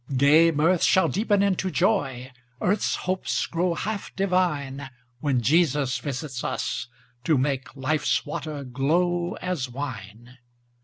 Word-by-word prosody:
Gay 150 +5 +6
mirth 165 +3 +2
shall 190 - +4
deepen 205 -1 +1
into 190 -1 +1
joy, 135 - 0 0.3
Earth's 205 +4 +1
hopes 185 +1 -1
grow 170 +1 -1
half 210 +3 -4
divine, 150 -8 0 0.3
When 130 -5 0
Jesus 145 -1 +2
visits 135 -2 -5
us, 125 0 -2 0.4
to 150 +2 +3
make 135 0 -2
Life's 145 +4 0
water 150 -1 -5
glow 170 +7 0
as 175 -9 -2
wine. 120 -2 -8
150 Hz, 120 wpm, -25 LUFS, 130-180 Hz, 0.4 s, Gay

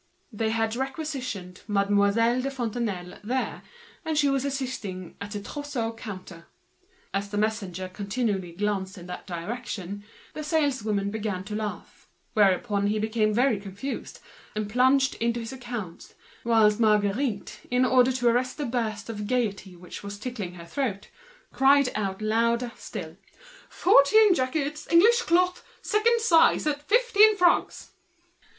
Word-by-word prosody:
They 220 +1 -1
had 225 0 0
requisitioned 260 - -4
Mademoiselle 205 +4 +2
de 270 - -2
Fontenailles 225 -8 -4
there, 255 +5 -2 0.4
and 315 -1 -2
she 290 -1 +4
was 275 -1 +1
assisting 250 -10 -4
at 200 - -5
the 205 - -3
outfitting 285 -6 -3
counter. 185 -6 -9 0.7
As 200 +1 -2
the 205 - -4
messenger 205 -4 -1
was 185 - -6
continually 200 -3 -2
glancing 195 -1 -2
in - - -10
that 180 - -7
direction, 200 +1 -5 0.3
the 305 - -5
saleswomen 255 -10 0
began 205 -4 -3
to 210 +2 -6
laugh. 215 -1 -6 0.3
He 205 +1 +2
became 215 0 +1
very 240 -1 +2
confused, 200 +7 -6 0.3
and 210 -1 -2
plunged 260 +4 +3
into 235 +1 +1
his 230 +2 -6
accounts; 240 -9 -7 0.3
whilst 220 -2 +4
Marguerite, 210 +1 +1
in 250 +1 +3
order 255 0 +4
to 245 -1 0
arrest 245 +2 +1
the 295 - -2
flood 220 -3 -2
of 210 -2 -5
gaiety 205 -6 -1
which 175 0 -10
was 200 0 -7
tickling 210 -6 -5
her 170 -1 -10
throat, 205 -1 -3 0.4
cried 275 0 +5
out 195 -1 -3
louder 235 +2 +1
still: - - -8 0.5
"Fourteen 390 +5 +5
jackets, 295 +1 -2
English 450 +8 +6
cloth, 360 -2 +2 0.2
second 460 +2 +2
size, 330 -9 +4
at 290 -1 -1
fifteen 435 +2 +4
francs!" 350 -2 +2
225 Hz, 140 wpm, -26 LUFS, 200-270 Hz, 0.7 s, English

